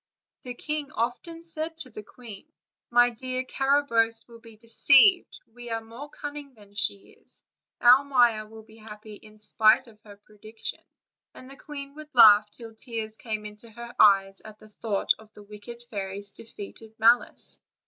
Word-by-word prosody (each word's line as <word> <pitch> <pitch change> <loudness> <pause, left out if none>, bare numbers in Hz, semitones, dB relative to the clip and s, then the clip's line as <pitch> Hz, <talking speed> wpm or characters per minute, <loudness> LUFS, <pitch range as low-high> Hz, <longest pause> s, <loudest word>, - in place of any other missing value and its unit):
The 250 -1 -8
king 300 +1 -4
often 250 +9 -4
said 325 -1 -4
to 265 -6 -3
the 215 - -8
queen: 230 +5 -13 0.4
"My 245 0 +4
dear, 255 +2 -4
Carabosse 255 -5 +1
will 235 -1 -15
be 225 -1 -16
de 225 - -24
ceived; 275 - +4 0.2
we 240 0 -10
are 225 0 -2
more 230 +6 -11
cunning 290 -2 -8
than 205 -2 -19
she 205 -1 -3
is; - - -23 0.4
our 250 +3 +6
Maia 240 -6 +2
will 220 0 -13
be 220 0 -19
happy 215 -1 -12
in 215 +1 -15
spite 215 +4 +3
of 215 -3 -19
her 205 -2 -14
prediction." 215 +2 -9 0.5
And 255 +1 -12
the - - -10
queen 280 -1 -9
would 305 0 -12
laugh 210 -3 +8
till 225 +1 -12
tears 220 -1 -7
came 215 -2 -5
into 210 +2 -11
her 235 +2 -10
eyes, 195 -1 +4
at 215 -1 -12
the 215 - -17
thought 210 -1 0
of 220 -1 -18
the 210 - -14
wicked 210 +3 -11
fairy's 200 -1 -5
defeated 220 0 -4
malice. 230 +2 +2
225 Hz, 170 wpm, -26 LUFS, 215-255 Hz, 0.5 s, laugh